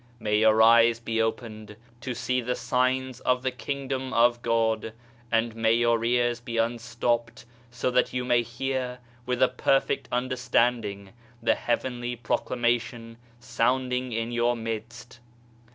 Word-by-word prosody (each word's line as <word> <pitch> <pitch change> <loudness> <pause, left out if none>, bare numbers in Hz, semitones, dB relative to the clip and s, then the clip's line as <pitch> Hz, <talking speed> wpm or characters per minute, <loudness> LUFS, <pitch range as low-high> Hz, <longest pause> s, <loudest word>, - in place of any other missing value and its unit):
May 105 -1 +1
your 110 0 +5
eyes 115 0 +6
be 115 -1 -1
opened 110 -2 -4 0.2
to 125 0 -5
see 125 +1 -1
the 125 +1 -2
signs 130 +1 0
of 125 0 0
the 130 - 0
Kingdom 135 0 -4
of 120 0 +3
God, 110 -1 0 0.4
and 115 0 +1
may 115 0 +2
your 115 -1 +2
ears 120 0 +1
be 120 -1 -6
unstopped 115 0 -1 0.2
so 125 +1 -2
that 125 - +2
you 125 0 -2
may 120 -1 +3
hear 125 +2 -3 0.3
with 125 0 +1
a - - +6
perfect 135 +2 0
understanding 120 -5 0 0.3
the - - +2
Heavenly 120 0 -2
Proclamation 120 -1 -2 0.2
sounding 125 +1 0
in 115 +1 -2
your 120 0 +1
midst. 115 +2 -7
120 Hz, 135 wpm, -26 LUFS, 115-125 Hz, 0.4 s, eyes